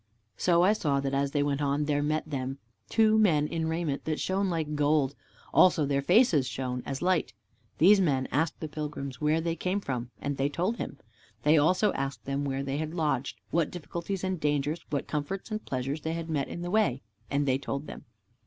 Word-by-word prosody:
So 170 Hz, -, +3 dB
I 195 Hz, +3 st, +5 dB
saw 145 Hz, -9 st, 0 dB
that 135 Hz, 0 st, -2 dB
as 140 Hz, 0 st, +1 dB
they 145 Hz, 0 st, +1 dB
went 145 Hz, 0 st, -1 dB
on, 145 Hz, +1 st, +1 dB
there 145 Hz, -1 st, +1 dB
met 155 Hz, +2 st, -1 dB
them 135 Hz, -2 st, -3 dB, 0.3 s
two 220 Hz, -1 st, +4 dB
men 160 Hz, -9 st, +4 dB
in 165 Hz, 0 st, -2 dB
raiment 160 Hz, -3 st, -2 dB
that 155 Hz, -1 st, -1 dB
shone 195 Hz, +1 st, 0 dB
like 160 Hz, -3 st, -2 dB
gold, 145 Hz, -2 st, +2 dB, 0.4 s
also 180 Hz, -4 st, +5 dB
their 140 Hz, 0 st, +1 dB
faces 175 Hz, -, +4 dB
shone 125 Hz, 0 st, -3 dB
as 135 Hz, -, -2 dB
the -, -, -1 dB
light. 185 Hz, -10 st, +1 dB, 0.4 s
These 195 Hz, +4 st, +6 dB
men 135 Hz, -7 st, +1 dB
asked 155 Hz, +2 st, 0 dB
the 160 Hz, -, -3 dB
pilgrims 145 Hz, -3 st, -5 dB
where 155 Hz, +2 st, +2 dB
they 165 Hz, 0 st, -1 dB
came 185 Hz, +3 st, -1 dB
from, 125 Hz, -9 st, -4 dB
and 140 Hz, -1 st, -3 dB
they 135 Hz, +1 st, +1 dB
told 185 Hz, +10 st, -1 dB
them. -, -, -5 dB, 0.5 s
They 150 Hz, +2 st, +5 dB
also 180 Hz, +7 st, +3 dB
asked 135 Hz, 0 st, -4 dB
them 140 Hz, +1 st, -1 dB
where 135 Hz, 0 st, -2 dB
they 135 Hz, 0 st, -2 dB
had 155 Hz, +1 st, -4 dB
lodged, 145 Hz, -5 st, -1 dB
what 165 Hz, -2 st, +2 dB
difficulties 175 Hz, +3 st, -5 dB
and 185 Hz, -2 st, -1 dB
dangers, 150 Hz, +2 st, 0 dB
what 140 Hz, -2 st, -1 dB
comforts 170 Hz, +8 st, -4 dB
and 215 Hz, 0 st, -3 dB
pleasures 135 Hz, +4 st, -3 dB
they 160 Hz, +2 st, -2 dB
had 165 Hz, -1 st, -4 dB
met 140 Hz, -3 st, 0 dB
in 175 Hz, -, -6 dB
the 175 Hz, -, -4 dB
way, 140 Hz, -, +2 dB, 0.3 s
and 140 Hz, 0 st, 0 dB
they 130 Hz, 0 st, +2 dB
told 140 Hz, +1 st, -4 dB
them. -, -, -9 dB
150 Hz, 210 wpm, -29 LUFS, 140-170 Hz, 0.5 s, These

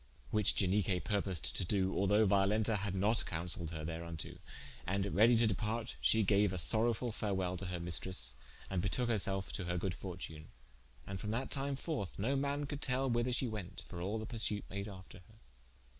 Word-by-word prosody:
Which 105 Hz, -3 st, +2 dB
Ianique 95 Hz, -1 st, +2 dB
purposed 100 Hz, -6 st, +1 dB
to -, -, 0 dB
doe, 95 Hz, +1 st, 0 dB
although 105 Hz, +3 st, +3 dB
Violenta 105 Hz, +2 st, +3 dB
had 100 Hz, -1 st, -3 dB
not 105 Hz, +4 st, +2 dB
consailed 85 Hz, 0 st, -2 dB
her 80 Hz, -2 st, -5 dB
thereunto: 80 Hz, 0 st, -5 dB, 0.5 s
and 100 Hz, +1 st, -1 dB
ready 115 Hz, +4 st, +6 dB
to 115 Hz, -, +5 dB
departe, 110 Hz, +3 st, -1 dB
shee 110 Hz, 0 st, +4 dB
gaue 100 Hz, +1 st, +4 dB
a 95 Hz, -, -3 dB
sorowefull 115 Hz, +5 st, +3 dB
farewell 95 Hz, -4 st, -1 dB
to 95 Hz, -, -5 dB
her 90 Hz, 0 st, -3 dB
maistres, 85 Hz, -6 st, +1 dB, 0.3 s
and 95 Hz, -2 st, -1 dB
betoke 120 Hz, +6 st, 0 dB
her 110 Hz, -3 st, +2 dB
selfe 95 Hz, 0 st, -2 dB
to 90 Hz, -, -2 dB
her 90 Hz, 0 st, -1 dB
good 90 Hz, +1 st, -1 dB
fortune: 85 Hz, -5 st, -7 dB, 0.6 s
and 95 Hz, -1 st, -5 dB
from 105 Hz, -, -4 dB
that 120 Hz, +4 st, -2 dB
time 140 Hz, 0 st, -1 dB
forth, 135 Hz, -, -4 dB
no 120 Hz, +8 st, 0 dB
man 140 Hz, +1 st, -1 dB
could 145 Hz, 0 st, -5 dB
tell 130 Hz, -1 st, +1 dB
whether 120 Hz, +1 st, +1 dB
she 125 Hz, +1 st, +1 dB
went, 105 Hz, -6 st, -6 dB
for 85 Hz, -, -7 dB
all 100 Hz, +5 st, -2 dB
the 110 Hz, -, -4 dB
persute 110 Hz, -3 st, +3 dB
made 100 Hz, +1 st, -4 dB
after 95 Hz, -2 st, -11 dB
her. 100 Hz, +5 st, -20 dB
100 Hz, 190 wpm, -35 LUFS, 90-110 Hz, 0.6 s, ready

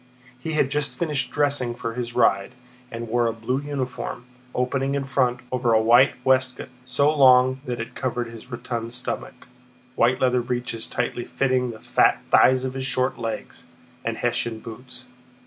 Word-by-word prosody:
He 160 Hz, +5 st, -4 dB
had 140 Hz, -3 st, +1 dB
just 145 Hz, 0 st, 0 dB
finished 150 Hz, -5 st, 0 dB
dressing 140 Hz, -5 st, 0 dB
for 115 Hz, -1 st, -4 dB
his 120 Hz, 0 st, -5 dB
ride, 100 Hz, +4 st, +2 dB, 0.4 s
and 115 Hz, 0 st, -6 dB
wore 120 Hz, +1 st, +1 dB
a -, -, +1 dB
blue 115 Hz, +4 st, -2 dB
uniform, 130 Hz, -3 st, -4 dB, 0.3 s
opening 135 Hz, +2 st, 0 dB
in 140 Hz, -, -1 dB
front 130 Hz, -2 st, 0 dB
over 125 Hz, -2 st, +1 dB
a 110 Hz, -, +5 dB
white 120 Hz, +4 st, +5 dB
waistcoat 130 Hz, -1 st, +1 dB, 0.2 s
so 140 Hz, +4 st, +2 dB
long 130 Hz, -1 st, +5 dB
that 120 Hz, -1 st, -3 dB
it 115 Hz, -, -6 dB
covered 125 Hz, -1 st, -2 dB
his 115 Hz, +2 st, -11 dB
rotund 120 Hz, -1 st, -5 dB
stomach, 125 Hz, +1 st, -4 dB, 0.5 s
white 125 Hz, +1 st, +2 dB
leather 125 Hz, -1 st, +2 dB
breeches 120 Hz, -2 st, -3 dB
tightly 120 Hz, 0 st, -2 dB
fitting 130 Hz, -2 st, 0 dB
the 115 Hz, -, -7 dB
fat -, -, +3 dB
thighs 130 Hz, 0 st, +5 dB
of 130 Hz, -, -3 dB
his 130 Hz, 0 st, -3 dB
short 130 Hz, -1 st, 0 dB
legs, 115 Hz, -1 st, -5 dB, 0.4 s
and -, -, -2 dB
Hessian 115 Hz, -1 st, -1 dB
boots. 125 Hz, +3 st, -10 dB
125 Hz, 165 wpm, -24 LUFS, 120-130 Hz, 0.5 s, a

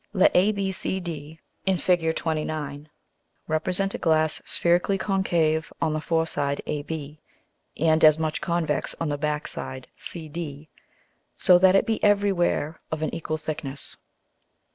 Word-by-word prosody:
_ -, -, -41 dB
Let 190 Hz, -, +4 dB
ABCD 185 Hz, -5 st, -1 dB, 0.3 s
[in 190 Hz, -1 st, +3 dB
Fig. 165 Hz, -3 st, +2 dB
29.] 155 Hz, -2 st, -3 dB, 0.6 s
represent 180 Hz, +5 st, +1 dB
a -, -, -4 dB
Glass 155 Hz, -1 st, +2 dB
spherically 175 Hz, +3 st, +2 dB
concave 175 Hz, -5 st, +1 dB
on 155 Hz, -, +1 dB
the 155 Hz, -, -1 dB
foreside 160 Hz, -4 st, 0 dB
AB, 150 Hz, 0 st, -5 dB, 0.6 s
and 160 Hz, 0 st, +3 dB
as 155 Hz, -1 st, +8 dB
much 155 Hz, -1 st, -2 dB
convex 170 Hz, -4 st, 0 dB
on 165 Hz, -, -1 dB
the 145 Hz, -, -1 dB
backside 150 Hz, -3 st, -3 dB
CD, 155 Hz, -2 st, -6 dB, 0.7 s
so 180 Hz, -1 st, +6 dB
that 190 Hz, +1 st, +6 dB
it 195 Hz, -, +4 dB
be 225 Hz, -1 st, -1 dB
every 205 Hz, -1 st, +4 dB
where 170 Hz, -4 st, 0 dB
of 160 Hz, 0 st, -2 dB
an -, -, -2 dB
equal 155 Hz, -1 st, -3 dB
thickness. 155 Hz, -3 st, -5 dB
160 Hz, 135 wpm, -25 LUFS, 155-180 Hz, 0.7 s, as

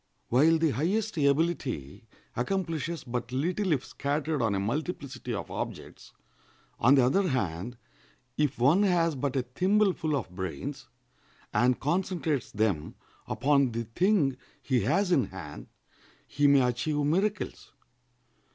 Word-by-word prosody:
While 155 Hz, +7 st, +5 dB
the 160 Hz, -2 st, +2 dB
highest 195 Hz, -, -1 dB
ability 140 Hz, -, 0 dB, 0.3 s
accomplishes 165 Hz, +1 st, -2 dB
but 120 Hz, 0 st, -4 dB
little 175 Hz, +8 st, 0 dB
if 140 Hz, -5 st, +1 dB
scattered 145 Hz, +1 st, -2 dB
on 110 Hz, -3 st, +1 dB
a -, -, 0 dB
multiplicity 130 Hz, -, -4 dB
of 105 Hz, -3 st, -4 dB
objects, -, -, -6 dB, 0.7 s
on 130 Hz, +5 st, +6 dB
the 130 Hz, -3 st, +5 dB
other 185 Hz, +10 st, +2 dB
hand, 115 Hz, -, -2 dB, 0.6 s
if 150 Hz, -2 st, 0 dB
one 140 Hz, +11 st, +4 dB
has 175 Hz, -5 st, +2 dB
but 140 Hz, -1 st, -2 dB
a 130 Hz, -, +1 dB
thimbleful 180 Hz, +3 st, +1 dB
of 130 Hz, -, -3 dB
brains, 90 Hz, -6 st, -5 dB, 0.7 s
and 125 Hz, 0 st, +3 dB
concentrates 165 Hz, -, -1 dB
them 100 Hz, -8 st, -1 dB, 0.3 s
upon 140 Hz, -3 st, +2 dB
the 115 Hz, +1 st, -2 dB
thing 140 Hz, -, +1 dB, 0.3 s
he 130 Hz, -3 st, +1 dB
has 180 Hz, -, +1 dB
in 140 Hz, -7 st, +4 dB
hand, 85 Hz, -6 st, -9 dB, 0.6 s
he 145 Hz, +1 st, +1 dB
may 140 Hz, -1 st, +6 dB
achieve 125 Hz, +5 st, 0 dB
miracles. 185 Hz, +8 st, -1 dB
140 Hz, 130 wpm, -28 LUFS, 120-170 Hz, 0.7 s, on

